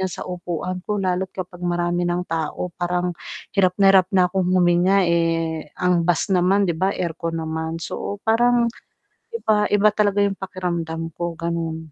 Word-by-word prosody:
sa - - -7
upuan 180 0 -4
ko, 210 +1 -2
lalo't 185 0 -1
kapag 180 -1 -8
marami 175 0 0
ng 175 +1 -1
tao 165 +2 -3
parang, 180 0 -1 0.4
hirap 185 -2 +3
na 195 - +5
hirap 185 -2 +5
na 185 -2 +4
akong 180 0 -1
huminga, 185 +1 +4
eh, 165 -2 0
ang 180 -2 +2
bus 175 +3 +1
naman 190 +3 +3
'di 170 - 0
ba 190 +4 +1
aircon 165 -2 -3
naman 160 +1 -3
so, 200 +4 -5
parang 240 +1 +3 0.6
iba, 215 - +1
iba 205 +1 +5
talaga 205 -1 +1
yung 200 -1 0
pakiramdam 170 -3 -4
ko, 170 -1 -4
ganon. 165 -1 -2
180 Hz, 160 wpm, -22 LUFS, 170-190 Hz, 0.6 s, na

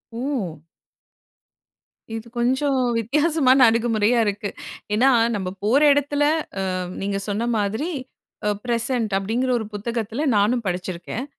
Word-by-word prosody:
ஓ! 235 - -3 1.6
இது 225 +1 -7
கொஞ்சம் 265 +3 +1 0.2
வித்தியாசமான 275 +2 +3
அணுகுமுறையா 230 0 +2
இருக்கு. 205 0 -2 0.4
ஏன்னா 245 +6 +4 0.3
நம்ப 190 -2 -3
போற 240 +8 +3
இடத்தில 285 +1 0 0.5
அ - - -2 0.3
நீங்க 195 0 -1
சொன்ன 205 +2 -1
மாதிரி 215 - -1 0.6
அ - - +3 0.2
பிரசன்ட் 235 -1 0
அப்படிங்கிற 230 +6 -1
ஒரு 220 - -4
புத்தகத்தில 225 +3 -3 0.2
நானும் 230 +4 +2
படிச்சிருக்கிறேன். 180 +6 -4
230 Hz, 110 wpm, -22 LUFS, 205-260 Hz, 1.6 s, ஏன்னா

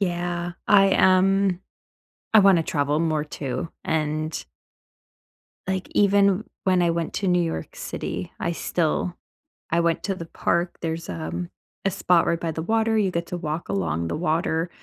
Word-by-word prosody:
Yeah. 175 -1 -2
I, 195 -1 +6
um, 190 0 +4 0.7
I - - +10
wanna 190 -4 +5
travel 145 0 0
more, 155 -2 0
too, 140 0 -4 0.2
and 155 0 -1 1.2
like, 190 0 -2
even 200 0 +3 0.2
when 185 -2 +3
I 170 - +3
went 165 -1 -2
to 200 - -1
New 180 -1 +3
York 165 - -4
City, 90 0 -5
I 170 - -1
still 170 +1 -1 0.6
I 170 - +2
went 170 -1 +1
to 195 - 0
the 170 -3 -7
park, 170 +2 -1
there's, 165 0 -4
um, 85 +1 -4 0.3
a 195 - +2
spot 180 -2 +3
right 170 -1 0
by 165 - -1
the 160 0 -4
water, 225 +3 +1
you 195 -3 +2
get 170 -1 -2
to 180 - -3
walk 160 -1 -4
along 85 -3 -1
the - - -2
water. 160 +1 0
170 Hz, 160 wpm, -24 LUFS, 155-185 Hz, 1.2 s, I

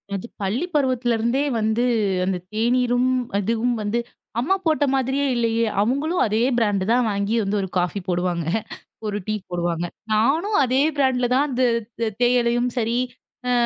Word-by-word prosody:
அது 195 +4 -5
பள்ளிப் 245 - -2
பருவத்திலிருந்தே 250 -2 +1 0.2
வந்து 220 +2 +1 0.4
அந்தத் 180 -1 -2
தேநீரும், 245 +2 +2 0.3
அதுவும் 230 +4 0
வந்து 210 +3 0 0.4
அம்மா 300 +11 +2
போட்ட 310 -2 +2
மாதிரியே 265 +2 0
இல்லையே. 230 -1 +1 0.2
அவங்களும் 280 - 0
அதே 215 +2 0 0.2
ப்ராண்டு 205 -5 +1
தான் 245 0 +3
வாங்கி 200 +2 -1
வந்து 200 +1 -1
ஒரு 190 - -3
காஃபி 180 +3 0
போடுவாங்க, 175 -2 0 0.6
ஒரு 205 -1 -2
டீ 215 - 0 0.2
போடுவாங்க. 175 -1 -1 0.3
நானும் 310 - +2
அதே 260 +1 +2 0.2
ப்ராண்ட்ல 260 -3 +2
தான் 285 +3 +3
இந்தத் 235 -3 -1
தேயிலையும் 240 0 +3
சரி, 230 0 0 0.5
அ - - +2
235 Hz, 140 wpm, -22 LUFS, 210-255 Hz, 0.6 s, தான்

